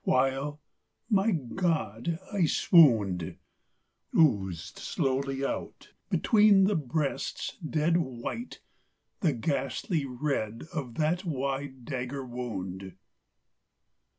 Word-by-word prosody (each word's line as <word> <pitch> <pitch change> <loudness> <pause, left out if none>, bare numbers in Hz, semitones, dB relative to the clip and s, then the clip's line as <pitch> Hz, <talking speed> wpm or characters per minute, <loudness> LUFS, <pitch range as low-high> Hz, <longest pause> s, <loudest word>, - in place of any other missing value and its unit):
while... 135 +3 +1 0.5
my 200 +1 +4
God! 160 - -1 0.2
I 190 -4 +3
swooned!... 110 - +4 0.8
Oozed 95 - +2
slowly 135 0 -1
out, - - -5 0.2
between 210 -4 +5
the 200 +2 +3
breasts' 150 -1 -2
dead 165 -1 +1
white, 145 - -4 0.6
The 160 -6 +2
ghastly 135 - -1
red 125 -4 -2
of 130 -8 -4
that 160 +4 +1
wide 135 -4 -3
dagger 130 0 -4
wound. 95 -7 -5
140 Hz, 90 wpm, -29 LUFS, 120-165 Hz, 0.8 s, between